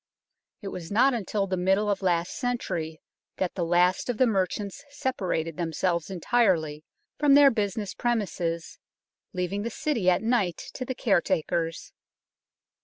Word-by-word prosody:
It 195 - -4
was 170 -2 -7
not 255 +6 +4
until 210 -3 -1
the 190 -1 -1
middle 190 +3 +2
of 205 -1 0
last 175 -2 +1
century 170 - -3 0.4
that 185 - -1
the 180 - -2
last 180 +5 +2
of 245 - -1
the 255 - +5
merchants 200 0 -1
separated 185 - -2
themselves 170 0 -1
entirely 175 -6 +1 0.4
from 290 -2 +5
their 285 -1 +8
business 205 -2 -2
premises, 180 -8 -2 0.5
leaving 185 +2 -2
the 230 - -2
City 235 -6 0
at 180 +3 +2
night 220 -7 +1 0.2
to 255 - -5
the 260 - -4
caretakers. 170 -6 0
190 Hz, 140 wpm, -27 LUFS, 175-230 Hz, 0.5 s, their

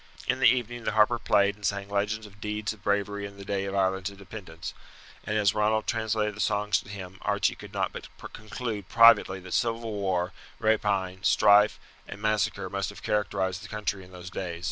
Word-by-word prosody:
In 130 0 +1
the 130 - +6
evening 120 -1 -1
the - - -1
harper 110 +2 +4
played 100 -2 +3
and 105 - -20
sang 100 -1 -1
legends 105 +2 -1
of 100 -1 -15
deeds 105 0 -2
of 105 - -17
bravery 100 0 -1
in 100 0 -14
the 100 - -9
day 100 0 -1
of 100 0 -4
Ireland's 95 0 +1
independence; 95 -4 -9 0.5
and 105 - 0
as 100 -2 +3
Ronald 110 +1 +1
translated 110 -2 0
the 105 - -12
songs 105 -1 +2
to - - -13
him 95 -2 -8
Archie - - +1
could - - -11
not - - -1
but - - -7 0.3
conclude 110 -2 -5
privately 115 -5 +6
that 90 -1 -8
civil 115 -1 0
war, 95 -3 -1 0.2
rapine, 100 -4 +1
strife, 105 +3 +5 0.3
and 100 - -8
massacre 105 -1 0
must 100 -1 -2
have 100 - -11
characterized 100 -2 -1
the - - -8
country 105 -2 -3
in 90 - -15
those 90 0 -9
days. 85 -3 -4
100 Hz, 195 wpm, -28 LUFS, 95-110 Hz, 0.5 s, the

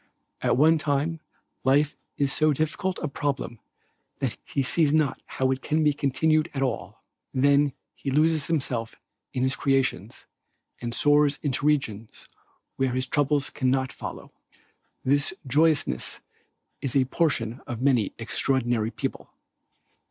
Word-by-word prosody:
At - - +2
one 160 +3 +5
time 150 +3 0 0.4
life 145 +3 +3 0.2
is 140 -1 +1
so 155 -1 +3
difficult 155 +5 -1
a - - +1
problem 140 -5 -3 0.6
that - - -1
he 140 - -1
sees 150 +2 +2
not 150 -4 +1
how 130 0 0
it 130 0 -2
can 155 +3 +1
be 150 -1 +4
continued 155 +2 +1
at 135 - 0
all. 130 -4 -4 0.3
Then 140 +1 +4 0.2
he 140 - -5
loses 155 +2 +2
himself 130 -8 -1 0.4
in 125 - -1
his 130 +1 +2
creations 130 -7 0 0.6
and 120 0 -3
soars 145 0 +4
into 145 0 0
regions 115 -8 -1 0.5
where 130 -2 +1
his 130 0 0
troubles 145 +1 +1
cannot 130 0 0
follow. - - -8 0.7
This 145 +6 +2
joyousness 145 - +1 0.6
is 135 -4 -2
the 135 -2 +4
portion 130 -5 0
of 120 -4 -4
many 125 -7 +2
extraordinary 120 -1 0
people. - - -5
140 Hz, 135 wpm, -26 LUFS, 130-150 Hz, 0.7 s, one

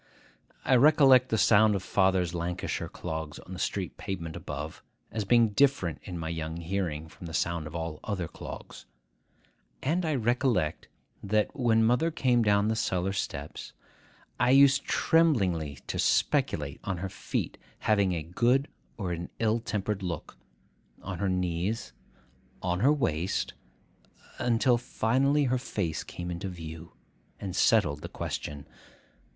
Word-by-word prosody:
I 130 - +4
recollect 135 -2 +6
the 110 - +1
sound 110 -1 +5
of 95 - -3
father's 95 -3 +2
Lancashire 85 +1 -3
clogs 80 -3 -5
on 95 - -10
the 90 - -7
street 95 -5 -2
pavement 85 -4 -5
above, 75 +3 -6 0.3
as 110 -2 -2
being 115 +1 +5
different 105 - +2
in 90 -2 -7
my 80 -1 -4
young 80 0 -4
hearing 85 -3 -3
from 85 +2 -11
the 80 - -5
sound 85 -2 -1
of 75 - -9
all 80 -2 -4
other 95 -6 -2
clogs; - - -9 1.0
and 165 +7 +1
I 155 -3 0
recollect, 120 - 0 0.3
that, 105 +1 0
when 115 -4 +3
mother 125 +8 +3
came 125 -6 +2
down 105 -1 +3
the 110 - +1
cellar 95 -3 0
steps, 75 -6 -5 0.7
I 125 - +3
used 140 +1 +6
tremblingly 95 - +2
to - - -4
speculate 70 -2 +1
on 95 -3 -2
her 95 +3 -3
feet - - -4 0.2
having 100 -4 +2
a 80 -2 -2
good 120 - +1 0.3
or 95 -5 -3
an 85 0 -4
ill 115 0 +1
tempered 105 -2 -2
look,—on 90 +1 -9
her 100 - 0
knees,—on 90 - -4
her 135 +8 +5
waist,—until 115 - -2
finally 135 +5 +1
her 130 -1 +1
face 95 -10 -3
came 90 0 -6
into 85 +3 -4
view, 80 -2 -9 0.5
and 95 -3 -5
settled 75 -12 +3
the - - -6
question. 70 -1 -5
95 Hz, 140 wpm, -29 LUFS, 85-120 Hz, 1.0 s, recollect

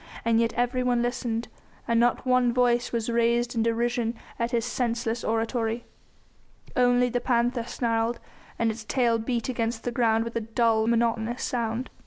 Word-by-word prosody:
And 230 -1 +3
yet 230 -1 +2
everyone 245 0 +1
listened, 240 -1 -2 0.4
and 230 0 +2
not 240 +2 +2
one 250 -1 +3
voice 245 0 +2
was 230 -2 -2
raised 235 0 +1
in 230 - 0
derision 235 +1 0 0.2
at 235 0 0
his 235 -2 0
senseless 235 -1 -1
oratory. 225 +1 -1 0.9
Only 245 0 +4
the 245 0 -1
panther 240 -1 +1
snarled, 230 -1 -1 0.4
and 230 -1 +1
its 220 0 -8
tail 235 0 +1
beat 230 0 -2
against 230 -2 -2
the 245 - -2
ground 225 -2 +2
with 230 0 -7
a 230 - 0
dull, 225 0 +1
monotonous 230 +1 0
sound. 235 +1 -2
235 Hz, 160 wpm, -26 LUFS, 230-245 Hz, 0.9 s, Only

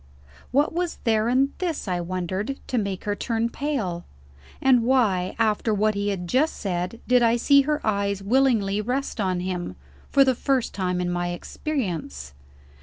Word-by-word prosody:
What 285 +5 +2
was 350 0 -2
there 220 0 +2
in 270 +3 +2
this 335 - -2
(I 180 -2 -1
wondered) 185 +8 -3
to 250 - -1
make 200 -3 -3
her 205 0 -1
turn 230 +1 -1
pale? 215 - -2 0.6
And 260 -2 +4
why, 220 -7 +2
after 220 -1 +1
what 215 +1 +2
he 200 0 -2
had 180 -3 -3
just 275 - +2
said, 185 +3 -3
did 250 0 +4
I 230 0 +4
see 280 +4 +5
her 300 0 +1
eyes 200 -2 0
willingly 215 -4 +2
rest 250 +1 -2
on 185 -2 0
him, 180 - -4 0.3
for 275 - +5
the 260 - +3
first 260 0 0
time 180 -2 -1
in 175 0 -1
my 175 0 -1
experience? 175 - -4
215 Hz, 170 wpm, -24 LUFS, 185-260 Hz, 0.6 s, see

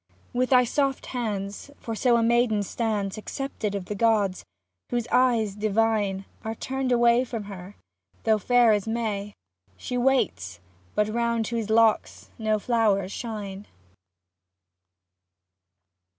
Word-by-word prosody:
With 250 +1 +1
thy 250 -1 +6
soft 275 +2 0
hands, 205 -2 -4
for 230 - -6
so 235 +2 +3
a 230 - +2
maiden 230 -2 +2
stands 210 -1 -2
Accepted 215 -3 -4
of 195 -2 -4
the 210 - -4
gods, 205 -3 +1 0.5
whose 240 -1 -1
eyes 235 -5 +3
divine 210 -2 0 0.2
Are 220 +1 -4
turned 265 +2 -3
away 240 0 +4
from 230 -4 -5
her 200 -1 -9 0.2
— 95 +1 -37
though 220 -1 +3
fair 245 +1 +4
as 205 0 -1
May 215 -3 -2 0.4
She 250 -1 -3
waits, 100 - 0 0.4
but 210 - +2
round 235 0 0
whose 225 -2 -3
locks 225 0 +2
no 215 -1 +1
flowers 210 -4 +1
shine. 205 -4 -6
220 Hz, 130 wpm, -26 LUFS, 205-240 Hz, 0.5 s, thy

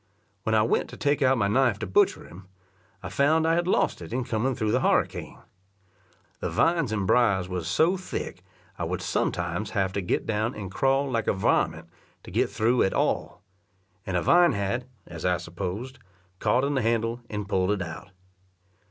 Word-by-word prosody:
When 110 - 0
I 110 - +4
went 115 - 0
to - - -10
take 145 +1 +1
out 130 -1 +4
my 100 -3 +2
knife 120 0 +2
to 110 - -4
butcher 95 - +2
him, 95 +3 -13 0.6
I - - -5
found 155 +3 +2
I 165 - +3
had 175 +1 +1
lost 185 - +1
it 85 - -9
in 130 +1 -1
coming 120 +3 -1
through 110 -1 -1
the 125 - +2
harricane. - - 0 1.0
The - - -2
vines 165 -8 +2
and 105 -3 -1
briers 100 -5 +3
was 90 -3 -4
so 160 - +2
thick 185 - -5
that - - -25 0.4
I - - -2
would - - -3
sometimes 85 +4 -1
have 95 -1 +1
to 100 - -1
get 90 - -1
down 110 +2 -1
and 95 -3 -6
crawl 135 +5 +1
like 115 -2 -1
a - - +3
varment 95 - +1 0.4
to - - -11
get - - +1
through 120 +3 +1
at 95 - +1
all; - - -1 0.6
and 95 -2 -2
a 85 - -1
vine 175 0 +5
had, 100 +5 -2 0.2
as 85 -1 -9
I 90 -1 +2
supposed, 95 +10 -6 0.4
caught 125 +2 +2
in 140 +1 0
the 135 - +1
handle 115 +1 0
and 105 -1 -4
pulled 95 -1 +1
it 105 -2 0
out. 80 - -8
110 Hz, 195 wpm, -26 LUFS, 95-130 Hz, 1.0 s, vine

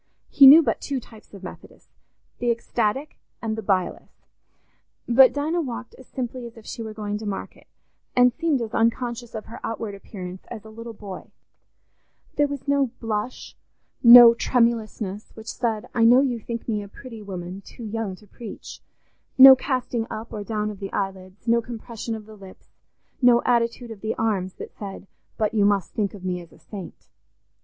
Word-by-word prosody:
He 275 -1 +9
knew 310 +5 +10
but - - -1
two 275 -2 -2
types 220 -2 -16
of 195 -2 -12
Methodist—the 240 +5 -9
ecstatic 235 +4 -1 0.2
and 220 -1 -3
the 220 - -4
bilious. 190 -3 -1 1.0
But 255 +2 +7
Dinah 310 +4 -1
walked 250 -4 -6
as 260 - -16
simply 250 -1 -5
as 230 - -15
if 220 - -14
she 235 - -7
were 220 -1 -7
going 210 -1 -4
to 215 - -6
market, 195 - -6 0.5
and 250 0 +5
seemed 305 -4 0
as 225 0 -7
unconscious 235 +1 -1
of 215 - -6
her 230 - -10
outward 225 -2 -4
appearance 185 -2 -9
as 225 -3 -9
a 220 - -11
little 230 +1 -9
boy: 200 -3 -9 1.1
there 290 - +3
was 285 -1 -7
no 280 -2 +2
blush, 225 +2 -4 0.5
no 235 -1 +11
tremulousness, 225 -4 -1
which 220 - -11
said, 225 -3 -2
"I 230 - +2
know 245 +3 +7
you 250 -4 0
think 230 +1 -6
me 215 -3 -1
a 200 - -8
pretty 230 +1 -11
woman, 185 -1 -7
too 235 - -12
young 220 -3 -4
to 210 - -19
preach"; 230 +3 -10 0.6
no 265 0 +11
casting 255 -3 -2
up 220 +2 -7
or 210 - -4
down 210 0 -2
of 200 - -11
the 195 -1 -6
eyelids, 195 +2 -5
no 235 0 +4
compression 230 -1 -6
of 215 -1 -9
the 215 0 -13
lips, 195 -2 -15 0.5
no 245 -1 +5
attitude 235 0 0
of 210 -3 -10
the 220 0 -2
arms 195 -5 -1
that - - -9
said, 200 -1 -8 0.3
"But 215 0 0
you 210 -2 +3
must 200 -3 +1
think 205 -2 -2
of 190 -2 -10
me 180 -1 -2
as 170 - -15
a - - -18
saint." 190 +3 -10
225 Hz, 180 wpm, -24 LUFS, 205-245 Hz, 1.1 s, no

